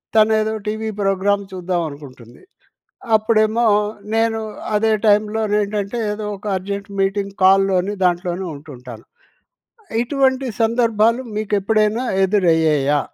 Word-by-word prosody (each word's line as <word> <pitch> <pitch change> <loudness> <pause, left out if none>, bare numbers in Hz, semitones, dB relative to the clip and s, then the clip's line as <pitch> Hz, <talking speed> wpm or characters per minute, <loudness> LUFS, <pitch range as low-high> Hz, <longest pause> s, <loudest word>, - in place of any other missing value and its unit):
తను 220 0 +5
ఏదో 215 0 -1
TV 220 +1 -2
programme 200 +1 +1
చూద్దాం 180 -1 -2
అనుకుంటుంది. 130 -5 -13 0.7
అప్పుడేమో 220 +1 +2 0.5
నేను 225 0 +1 0.4
అదే 220 +1 +2
టైమ్‌లో‌ని 210 0 +2
ఏంటంటే 205 +2 -3
ఏదో 210 0 -5
ఒక 200 - -18
అర్జెంట్ 200 +2 -6
మీటింగ్ 195 0 -1
కాల్‌లోని, 195 0 +3
దాంట్లోనే 180 +1 -1
ఉంటుంటాను. 125 -6 -11 1.0
ఇటువంటి 265 +1 +1 0.2
సందర్భాలు 230 0 +2
మీకు 215 -1 -3
ఎప్పుడైనా 215 +3 +1 0.2
ఎదురయ్యాయా? 160 -7 +2
205 Hz, 105 wpm, -19 LUFS, 180-220 Hz, 1.0 s, తను